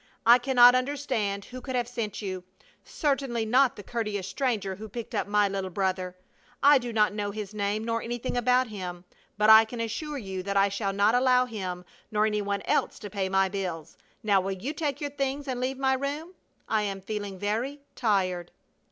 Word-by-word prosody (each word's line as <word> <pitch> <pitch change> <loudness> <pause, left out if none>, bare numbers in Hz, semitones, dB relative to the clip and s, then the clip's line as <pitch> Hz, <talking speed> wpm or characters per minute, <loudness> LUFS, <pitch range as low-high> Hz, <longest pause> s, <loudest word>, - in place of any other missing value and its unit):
I 240 +2 +8
cannot 245 -1 +7
understand 255 -7 -1
who 255 0 -9
could 260 0 -4
have 240 -2 0
sent 225 -3 -4
you! 185 -2 -4 0.4
Certainly 270 -6 -1
not 255 +4 +3
the 205 - -9
courteous 210 -5 -3
stranger 205 -4 -1
who 215 +1 -8
picked 235 +2 -7
up - - -1
my 205 0 +3
little 195 -1 -3
brother. 185 -1 -2 0.5
I 285 0 +7
do 240 -1 -5
not 210 -2 +2
know 205 -1 -2
his 210 0 -6
name, 205 +1 -1
nor 230 0 -1
anything 240 +2 -4
about 250 +1 +3
him, 185 -5 -7 0.3
but 210 +1 +6
I 220 0 +10
can 230 +2 -8
assure 285 +7 -3
you 190 -6 -5
that 200 +1 -2
I 195 0 +4
shall 200 0 -2
not 200 +3 +3
allow 250 0 +4
him 185 -6 -5 0.3
nor 210 0 +2
any 210 -1 0
one 200 0 -2
else - - 0
to 205 - -8
pay 190 -1 -1
my 195 0 +3
bills. 180 -5 -5 0.3
Now 200 -3 +3
will 195 +1 -2
you 235 +11 -4
take 295 -3 -2
your 290 -1 -3
things 275 0 -2
and 255 -2 -2
leave 255 +1 -2
my 265 0 +2
room? 290 +6 -3 0.3
I 220 -1 +1
am 200 -2 -3
feeling 205 -1 -5
very 230 +9 -2
tired!" 185 -6 0
215 Hz, 200 wpm, -27 LUFS, 195-250 Hz, 0.5 s, I